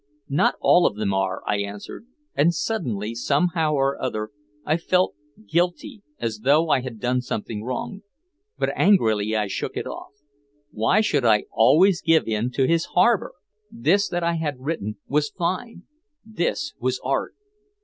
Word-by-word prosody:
"Not 140 - +2
all 175 - +5
of - - -3
them 105 -2 -1
are," 95 -1 -1
I 105 - +1
answered. 100 - -7 0.3
And 165 +4 +2
suddenly, 120 - -2
somehow 155 +6 +1
or 135 0 0
other, 110 -4 -3 0.3
I 155 +2 +2
felt 180 +2 +1 0.3
guilty, 180 - -1 0.2
as 115 -2 -3
though 150 +7 +3
I 130 - +3
had 125 -3 -7
done 125 +3 0
something 110 -3 -5
wrong. 130 - -4 0.6
But - - 0
angrily 110 - +3
I 105 -1 +1
shook 100 - -4
it - - -3
off. - - -8 0.6
Why 110 - +2
should 150 - +1
I 110 -3 +4
always 160 - +4
give 165 0 +3
in 110 +2 0
to 135 - +2
his 165 +3 +2
harbor? 205 +4 +3 0.4
This 205 -3 +1
that 175 -1 -2
I 170 0 +1
had 150 -3 -2
written 120 -8 -3
was 150 +1 +1
fine! 185 +3 -3 0.4
This 220 +7 -2
was 125 +1 -1
Art! 135 +1 -1
145 Hz, 160 wpm, -23 LUFS, 110-175 Hz, 0.6 s, all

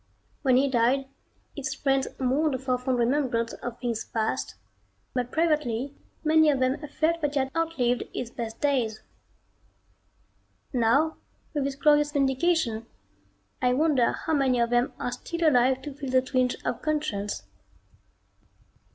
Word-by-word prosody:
When 260 -3 +4
he 275 +2 +3
died 260 +1 +2 0.5
his 265 -2 -3
friends 270 -1 +1
mourned 265 +2 +1
for 255 -1 0
fond 255 0 0
remembrance 240 -2 +1
of 240 -1 -6
things 235 -3 -2
past, 220 -1 -2 0.6
but 250 -1 -2
privately 290 -6 0 0.3
many 315 0 +5
of 280 -3 +2
them 255 +1 +1
felt 325 +3 0
that 295 -1 0
he - - +3
had 265 0 -1
outlived 300 -8 0
his 240 -1 -5
best 230 -2 -6
days. 250 -7 0 1.7
Now 255 +7 +2 0.4
with 290 -3 0
this 275 -1 -2
glorious 295 +1 +3
vindication, 265 -4 +1 0.7
I 250 -1 +3
wonder 285 -5 +3
how 320 - -3
many 265 -4 +2
of 235 0 +1
them 240 +1 +2
are 245 - -3
still 335 +7 -2
alive 260 -1 +3
to 290 - -6
feel 275 -1 -6
the 255 0 +3
twinge 255 -1 +1
of - - -2
conscience.... 210 - -2
265 Hz, 145 wpm, -27 LUFS, 245-295 Hz, 1.7 s, many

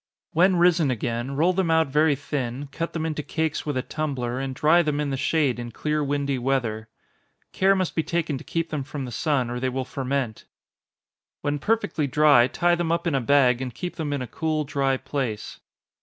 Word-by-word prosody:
When 185 +3 +4
risen 170 -3 +4
again, 120 +2 -2
roll 170 +6 +3
them 185 -2 0
out 160 -2 +3
very 150 +1 +3
thin, 135 -1 -4
cut 165 +3 -4
them 160 -1 -2
into 155 -2 -2
cakes 160 +1 -2
with 145 -3 -1
a 130 - -1
tumbler, 130 -6 -3
and 135 -1 -3
dry 155 +6 +4
them 150 -3 -1
in 145 -2 -1
the - - 0
shade 135 -2 +1
in 120 -1 -6
clear 150 +5 -1
windy 140 -1 -1
weather. 120 -4 -1 0.6
Care 195 +1 +4
must 185 -2 -1
be 160 - +1
taken 165 -1 -1
to - - -10
keep 165 -1 -3
them 150 -3 -2
from 140 0 -5
the 125 - -7
sun, 130 -2 0
or 125 - -3
they 130 +1 0
will 130 0 -3
ferment. 130 -4 -3 1.0
When 145 0 -1
perfectly 195 -5 0
dry, 140 -3 +5
tie 175 +6 +1
them 175 -1 0
up 170 +1 0
in 170 - 0
a 135 - +1
bag, 125 -1 +4
and 125 -2 -5
keep 180 -1 -5
them 155 -3 -2
in 140 -3 -1
a - - -6
cool 155 +4 -1
dry 135 -2 0
place. 130 -5 -4
145 Hz, 210 wpm, -25 LUFS, 130-160 Hz, 1.0 s, dry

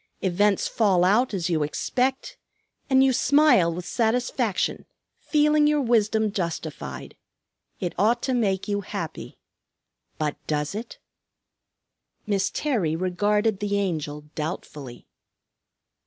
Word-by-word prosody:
Events 195 +2 +2
fall 195 -6 +2
out 220 +7 +3
as 185 -4 -2
you 165 -3 0
expect, 260 - -1 0.5
and 265 0 +5
you 265 -1 +3
smile 250 - +4
with 175 +1 -6
satisfaction, 235 -2 -1 0.3
feeling 300 0 +3
your 300 0 +2
wisdom 220 -4 +2
justified. 160 - -5 0.6
It 175 - -3
ought 230 +4 +2
to 260 - 0
make 200 -5 0
you 205 -1 -1
happy. - - -6 0.8
But 150 -2 -2
does 150 +1 -1
it?" 225 +3 -7 1.3
Miss 200 -3 0
Terry 210 - -1
regarded 205 +4 0
the 205 -1 -1
Angel 155 -7 -2
doubtfully. 150 -5 -6
205 Hz, 110 wpm, -25 LUFS, 170-240 Hz, 1.3 s, and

